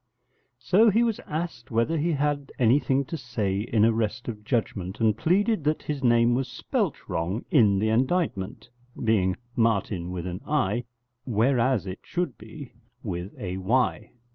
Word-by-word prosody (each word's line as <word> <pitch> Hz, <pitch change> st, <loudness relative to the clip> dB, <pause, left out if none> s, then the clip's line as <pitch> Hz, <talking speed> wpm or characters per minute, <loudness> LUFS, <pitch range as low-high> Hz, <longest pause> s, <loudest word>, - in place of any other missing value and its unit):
So 200 Hz, -, +4 dB
he 225 Hz, +4 st, +3 dB
was 230 Hz, -3 st, 0 dB
asked 155 Hz, -6 st, -4 dB
whether 115 Hz, +7 st, +1 dB
he 170 Hz, +3 st, +1 dB
had 145 Hz, -1 st, -1 dB
anything 135 Hz, +3 st, +3 dB
to 165 Hz, -, -5 dB
say 110 Hz, -8 st, -2 dB
in 110 Hz, 0 st, +2 dB
arrest 110 Hz, 0 st, 0 dB
of 105 Hz, -3 st, -5 dB
judgement, 105 Hz, -5 st, -2 dB
and 110 Hz, -2 st, +3 dB
pleaded 195 Hz, -, +1 dB
that 155 Hz, +1 st, 0 dB
his 145 Hz, -3 st, -4 dB
name 120 Hz, -1 st, +4 dB
was 130 Hz, +1 st, 0 dB
spelt 120 Hz, -, -2 dB
wrong 90 Hz, +8 st, -2 dB
in 105 Hz, -9 st, +5 dB
the 110 Hz, +3 st, +1 dB
indictment, 120 Hz, -, 0 dB, 0.4 s
being 95 Hz, -5 st, +2 dB, 0.2 s
Martin 100 Hz, -6 st, 0 dB
with 90 Hz, -1 st, -4 dB
an 90 Hz, 0 st, -5 dB
I, 125 Hz, -5 st, 0 dB, 0.4 s
whereas 120 Hz, -1 st, +2 dB
it 95 Hz, 0 st, -6 dB
should 180 Hz, 0 st, -3 dB
be 145 Hz, -5 st, -11 dB, 0.3 s
with 90 Hz, -3 st, -5 dB
a 95 Hz, -2 st, -4 dB
Y. 120 Hz, +7 st, 0 dB
115 Hz, 155 wpm, -26 LUFS, 105-145 Hz, 0.4 s, in